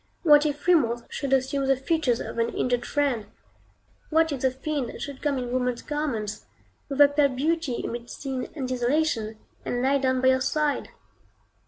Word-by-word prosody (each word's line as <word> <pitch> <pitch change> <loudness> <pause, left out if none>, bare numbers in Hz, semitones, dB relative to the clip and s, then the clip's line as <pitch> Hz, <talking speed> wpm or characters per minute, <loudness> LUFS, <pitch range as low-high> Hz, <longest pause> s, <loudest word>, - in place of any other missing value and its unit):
What 295 -2 +6
if 295 0 -4
Remorse 245 -10 +3
should 275 -2 -4
assume 270 +1 +1
the 270 -1 +3
features 270 -4 +1
of - - -5
an 230 0 +2
injured 245 0 -1
friend? 270 -8 0 0.8
What 320 0 +3
if 275 -3 -3
the 265 - +3
fiend 265 0 -4
should 280 -2 -7
come 290 -2 0
in 245 -1 -3
woman's 250 -1 -1
garments, 230 -9 -3 0.4
with 275 0 -4
a 290 - +10
pale 285 0 +3
beauty 290 0 -1
amid 235 0 -5
sin 265 -2 -5
and 270 -4 -3
desolation, 250 -3 0 0.3
and 245 0 -2
lie 275 +1 +3
down 260 -1 +1
by 260 0 +4
your 260 0 +3
side? 300 +1 0
265 Hz, 175 wpm, -26 LUFS, 245-295 Hz, 0.8 s, a